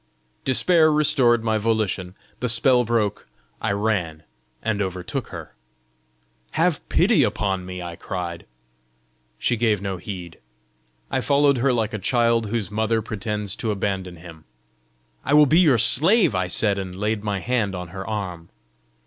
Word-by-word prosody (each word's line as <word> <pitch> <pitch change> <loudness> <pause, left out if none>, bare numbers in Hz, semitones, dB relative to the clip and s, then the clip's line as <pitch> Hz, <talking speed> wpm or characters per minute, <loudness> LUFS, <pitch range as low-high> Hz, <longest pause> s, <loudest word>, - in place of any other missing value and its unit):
Despair 155 +4 +4
restored 130 -6 +3
my 110 -1 +1
volition; 105 -4 -1 0.2
the 125 - -1
spell 125 +2 +4
broke; 110 -3 -1 0.3
I 110 - 0
ran, 100 -7 -1 0.4
and 105 -2 -1
overtook 90 -2 -4
her. - - -9 1.0
"Have - - +1
pity - - +3
upon 95 -2 -1
me!" 90 -1 -6
I 85 -1 -7
cried. 85 -2 -6 0.9
She 120 - 0
gave 110 -3 +1
no 95 -1 -4
heed. 90 -3 -8 0.7
I 130 - 0
followed 140 -1 +3
her 135 +2 +2
like 115 -2 -1
a 110 - -3
child 115 +1 +1
whose 105 -3 -3
mother 110 +1 0
pretends 105 -1 -4
to 115 - -3
abandon 95 -3 -2
him. 80 -2 -13 0.8
"I 145 - +2
will 150 0 +7
be 155 +4 +4
your 150 -9 +5
slave!" 155 - +4
I 90 0 0
said, 100 +2 0
and 95 -2 -6
laid 105 +2 -2
my 100 -2 -2
hand 105 -1 -1
on 90 -1 -6
her 95 +2 -7
arm. 90 -6 -5
105 Hz, 150 wpm, -23 LUFS, 95-120 Hz, 1.0 s, will